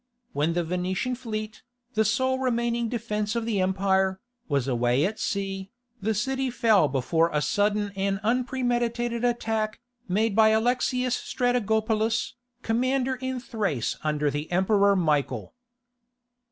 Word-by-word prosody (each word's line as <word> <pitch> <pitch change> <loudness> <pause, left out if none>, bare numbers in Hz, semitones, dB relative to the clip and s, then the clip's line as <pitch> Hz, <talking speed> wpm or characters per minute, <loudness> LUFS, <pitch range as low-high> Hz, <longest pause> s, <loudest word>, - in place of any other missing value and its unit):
When 150 +3 +1
the 175 0 0
Venetian 180 +8 -2
fleet, 215 -3 -5 0.3
the 220 - +3
sole 260 +4 +1
remaining 235 -2 0
defence 215 -2 -2
of 230 -1 -1
the 215 -4 0
empire, 190 0 +1 0.3
was 140 -4 0
away 125 +2 +2
at 215 +3 -3
sea, 195 -1 -3 0.3
the 220 +2 0
city 265 +5 -1
fell 225 - +4
before 155 +5 +1
a 150 - +1
sudden 205 +5 +1
and 195 0 0
unpremeditated 240 -1 0
attack, 225 -3 0 0.3
made 205 +3 +1
by 220 0 +6
Alexius 245 +2 +1
Strategopulus, 220 -2 0 0.3
commander 255 +3 +1
in 260 0 -3
Thrace 205 - -2
under 150 -1 0
the 145 +3 -4
emperor 200 +2 +3
Michael. 145 - 0
215 Hz, 125 wpm, -26 LUFS, 190-240 Hz, 0.3 s, by